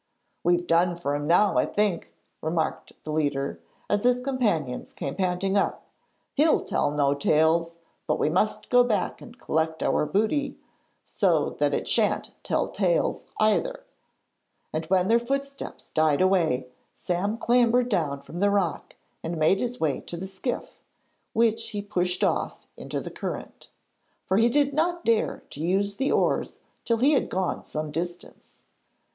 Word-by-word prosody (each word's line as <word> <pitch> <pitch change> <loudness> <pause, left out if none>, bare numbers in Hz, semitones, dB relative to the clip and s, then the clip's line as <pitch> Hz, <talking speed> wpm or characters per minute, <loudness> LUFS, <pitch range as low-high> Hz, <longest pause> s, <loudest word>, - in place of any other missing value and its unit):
'We've 175 +1 +2
done 175 +1 +3
for 145 -4 -2
him 145 0 -2
now 185 +5 +4
I - - +2
think,' 205 -4 -1 0.3
remarked 160 0 -2
the 155 - -5
leader, 145 -3 -1 0.3
as 205 0 +1
his 250 0 +3
companions 215 - -1
came 140 - -4
panting 190 +1 0
up. 200 - 0 0.5
'He'll 305 +3 +3
tell 145 - 0
no 145 -1 +2
tales; 160 +3 +2 0.3
but - - +1
we - - +1
must 185 +7 0
go 245 0 +7
back 215 -6 -1
and 240 +1 -12
collect 160 -6 -1
our 150 - +1
booty, 220 - 0 0.5
so - - +1
that - - +2
it - - -3
shan't - - +1
tell - - 0
tales - - 0
either,' - - +1 0.9
and 160 +1 -2
when 185 +2 +2
their 230 +2 +4
footsteps 275 +3 -5
died 155 -2 +2
away 170 -9 +2 0.3
Sam 195 +5 -1
clambered 245 +1 +3
down 150 - 0
from 165 +5 -8
the 205 +1 +3
rock 195 -5 -1 0.3
and 165 +1 -3
made 160 +5 +3
his 245 0 -3
way 150 -4 0
to 170 - -7
the 185 - -5
skiff, 195 +6 -5 0.5
which 230 0 +1
he 205 - -4
pushed 180 -3 -1
off - - -1
into - - -5
the - - -7
current, - - -6 0.6
for 190 - +1
he 230 +2 +5
did 285 +2 +2
not 340 +3 0
dare 230 -1 +1
to - - -9
use 195 +4 0
the 270 +1 0
oars - - +1 0.3
till 230 - +2
he 265 +6 +4
had 285 - +2
gone 185 -1 -2
some 155 0 -4
distance. 175 +3 -7
190 Hz, 160 wpm, -26 LUFS, 160-235 Hz, 0.9 s, go